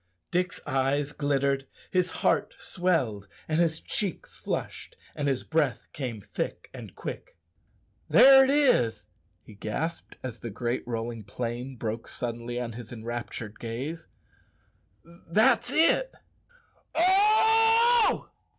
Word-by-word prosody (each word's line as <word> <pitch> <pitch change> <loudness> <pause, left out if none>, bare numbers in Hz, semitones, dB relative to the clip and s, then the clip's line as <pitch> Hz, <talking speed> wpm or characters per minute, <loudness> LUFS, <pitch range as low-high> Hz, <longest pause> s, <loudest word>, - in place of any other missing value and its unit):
Dick's 180 0 -1
eyes 140 +2 0
glittered, 140 -2 0
and 135 - -25 0.3
his 185 -1 +2
heart - - 0
swelled, 130 - -1 0.2
and 155 +1 0
his 165 -2 +1
cheeks 195 -5 -3
flushed, - - -5 0.2
and 145 - -2
his 135 -2 0
breath 155 -5 0
came 120 -7 -5
thick - - -5
and - - -10
quick. - - -8 0.7
"There 270 0 +8
it 265 - +1
is," 270 - +3 0.4
he - - -14
gasped, 150 +11 -4
as 120 -3 -6
the 115 - -6
great 120 +3 -2
rolling 115 -1 -4
plain 120 +5 -5
broke 115 -1 -4
suddenly 120 0 -4
on 120 -1 -4
his 115 0 -9
enraptured 115 -2 -6
gaze; 135 +8 -5 1.0
"that's 215 +9 +1
it 335 - +3 0.8
oh! 445 +5 +4
140 Hz, 120 wpm, -27 LUFS, 120-190 Hz, 1.0 s, There